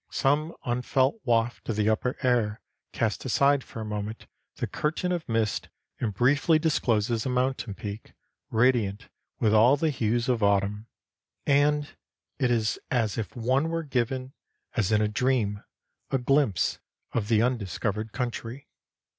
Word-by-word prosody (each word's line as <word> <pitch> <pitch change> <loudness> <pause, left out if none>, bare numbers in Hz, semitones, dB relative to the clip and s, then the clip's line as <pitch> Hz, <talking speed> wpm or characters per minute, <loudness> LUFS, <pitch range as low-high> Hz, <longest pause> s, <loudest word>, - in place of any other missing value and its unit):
Some 150 +4 +1
unfelt 130 - +1
waft 120 -1 0
of 115 - 0
the 105 0 +1
upper 110 +3 0
air 115 -4 +2 0.3
casts 110 -2 -1
aside 140 +2 +3
for 115 - -8
a - - -4
moment 105 +1 -5 0.3
the - - -2
curtain 160 +4 -2
of 175 -6 -3
mist 115 -2 0 0.3
and 115 - -1
briefly 140 - +3
discloses 120 -8 +1
a - - -2
mountain 125 -4 -1
peak, 105 +1 -7 0.4
radiant 115 -3 +1 0.3
with 110 -3 +3
all 120 +6 +6
the 155 +1 +1
hues 115 -2 0
of 125 -3 +1
autumn, 100 +1 +1 0.6
and 145 +1 +3 0.5
it 130 -3 +2
is 115 -3 +1
as 115 -5 +1
if 110 - -5
one 130 +6 +1
were 165 0 -2
given, 130 -1 -2 0.4
as 110 -5 +1
in 105 0 +3
a - - +2
dream, 105 -2 0 0.5
a 135 - +1
glimpse 135 - +1 0.3
of 105 -3 -1
the 110 0 +3
undiscovered 110 -2 -2
country. 120 +2 -5
120 Hz, 145 wpm, -27 LUFS, 110-135 Hz, 0.6 s, all